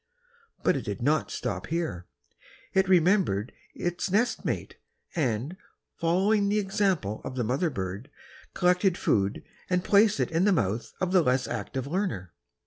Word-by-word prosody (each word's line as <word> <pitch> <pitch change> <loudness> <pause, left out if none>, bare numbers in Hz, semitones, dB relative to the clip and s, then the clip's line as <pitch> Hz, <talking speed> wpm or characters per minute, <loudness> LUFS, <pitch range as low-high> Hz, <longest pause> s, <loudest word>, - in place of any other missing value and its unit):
But - - +3
it - - -3
did - - -4
not - - +2
stop - - -4
here; 155 - -3 0.7
it 190 0 +3
remembered 175 - +3 0.2
its 175 +2 -2
nest 225 +6 +1
mate, - - -3 0.4
and, 135 +1 -1 0.4
following 200 +5 +2
the 210 - +2
example 195 - 0
of - - -6
the 125 - 0
mother 130 +9 0
bird, 100 +1 -5 0.5
collected 180 0 +3
food 100 0 0 0.3
and 180 -1 +1
placed 205 +1 +4
it - - 0
in 165 +3 +2
the 205 - +4
mouth 110 - -1
of 185 -1 -1
the 185 -1 +5
less 130 -3 +1
active 120 +3 -4
learner. 140 - -3
170 Hz, 150 wpm, -27 LUFS, 120-190 Hz, 0.7 s, the